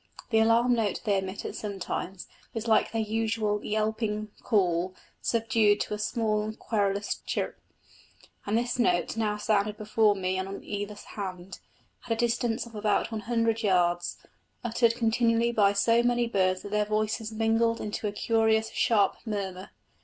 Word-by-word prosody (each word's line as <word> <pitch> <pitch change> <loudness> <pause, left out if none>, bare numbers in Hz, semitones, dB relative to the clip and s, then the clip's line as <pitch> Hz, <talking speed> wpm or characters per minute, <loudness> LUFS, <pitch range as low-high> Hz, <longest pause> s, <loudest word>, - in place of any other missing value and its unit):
The 220 - +4
alarm 230 +2 +4
note 225 -4 0
they 200 -3 +2
emit 190 +1 -6
at - - -4
such 205 -2 -5
times 185 0 -4 0.3
is 225 +1 -3
like 220 - +3
their 225 -1 0
usual 215 -1 -1
yelping 215 0 -1
call 185 -3 +1 0.3
subdued 225 -3 +2
to - - -2
a 210 - -3
short, 215 -1 -1
querulous 200 -2 -1
chirp; - - -2 0.9
and 210 +2 +2
this 240 +1 -1
note 180 -6 +2
now 215 -2 0
sounded 210 0 +1
before 215 -1 +2
me 185 -1 -1
and 190 - -3
on 195 - -7
either 205 0 -4
hand, 185 -3 -7 0.5
at 230 - +1
a - - -1
distance 235 0 0
of 235 - -13
about 210 +1 0
one 220 -1 -3
hundred 230 -1 0
yards, 175 -4 +1 0.5
uttered 235 0 +2
continually 230 0 +2
by 205 -4 +4
so 230 +4 +3
many 240 0 +2
birds 185 -5 +1
that 205 - -8
their 210 0 +2
voices 215 +1 -1
mingled 225 +1 +1
into 210 0 -3
a - - -1
curious 220 +1 +1
sharp 205 -4 +2
murmur. 195 -4 -4
215 Hz, 160 wpm, -28 LUFS, 200-225 Hz, 0.9 s, The